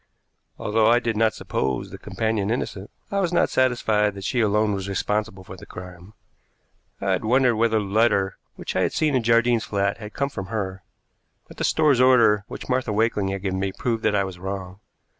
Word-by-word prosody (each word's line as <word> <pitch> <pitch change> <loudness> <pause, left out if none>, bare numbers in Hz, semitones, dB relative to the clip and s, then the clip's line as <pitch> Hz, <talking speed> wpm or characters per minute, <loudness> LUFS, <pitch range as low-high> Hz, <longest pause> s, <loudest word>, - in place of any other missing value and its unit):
Although 110 +1 +1
I 120 +1 +5
did 120 -2 -1
not 110 0 +2
suppose 65 -2 -2
the - - -9
companion 110 -2 -2
innocent, 105 -4 -3 0.2
I 200 - 0
was 180 -3 0
not 175 - +2
satisfied 110 -5 +2
that 100 - -8
she 125 +6 -1
alone 105 0 +2
was 95 0 -4
responsible 105 0 -2
for 95 - -10
the - - -13
crime. 90 +2 -11 0.9
I 100 -1 -1
had 95 - 0
wondered 125 +1 +3
whether 110 0 +2
the 105 - -1
letter 100 -2 +1 0.2
which - - -6
I - - +2
had - - 0
seen 155 -2 +1
in 130 - +2
Jardine's 115 0 +3
flat 100 +1 -1
had 105 -1 -9
come 140 0 -1
from 95 -8 -6
her, 95 -3 -4 0.7
but - - -14
the - - -3
store's 150 -5 +3
order 115 -5 +5
which - - -8
Martha 125 -3 0
Wakeling 105 -2 +1
had 95 0 -4
given 95 -1 -1
me 95 0 -1
proved 115 -2 -2
that 110 -1 +1
I 100 - +2
was 95 -2 -7
wrong. 95 0 -6
105 Hz, 205 wpm, -23 LUFS, 95-115 Hz, 0.9 s, I